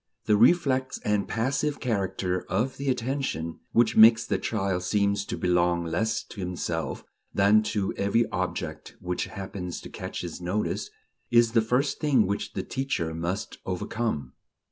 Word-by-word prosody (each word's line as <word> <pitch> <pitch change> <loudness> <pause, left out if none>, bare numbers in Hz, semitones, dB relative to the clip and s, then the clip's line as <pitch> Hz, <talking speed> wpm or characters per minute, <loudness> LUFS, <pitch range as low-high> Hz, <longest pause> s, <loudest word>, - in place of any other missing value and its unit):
The 105 - +4
reflex 130 +2 +3
and 105 -1 +1
passive 135 +6 -1
character 95 -6 -1
of 110 +8 0
the 140 0 -2
attention... 125 - -2
which 115 -1 +3
makes 115 +1 +8
the 100 -4 0
child 95 -3 -1
seem 100 +2 +2
to 100 0 -3
belong 90 -1 +2
less 110 +7 -1
to 105 - -12
himself 90 -1 -3 0.3
than 100 +2 +5
to 100 -3 -1
every 100 +4 +2
object - - -4
which 90 0 -2
happens 95 -3 -6
to - - -9
catch - - -5
his 85 0 -6
notice, 100 - -2 0.4
is 120 -1 +5
the 115 -1 +4
first 125 +5 0
thing 135 -8 +3
which 100 +2 -3
the - - -3
teacher 130 -12 -2
must 85 +5 -3
overcome.... 90 - -3
105 Hz, 150 wpm, -27 LUFS, 90-120 Hz, 0.4 s, makes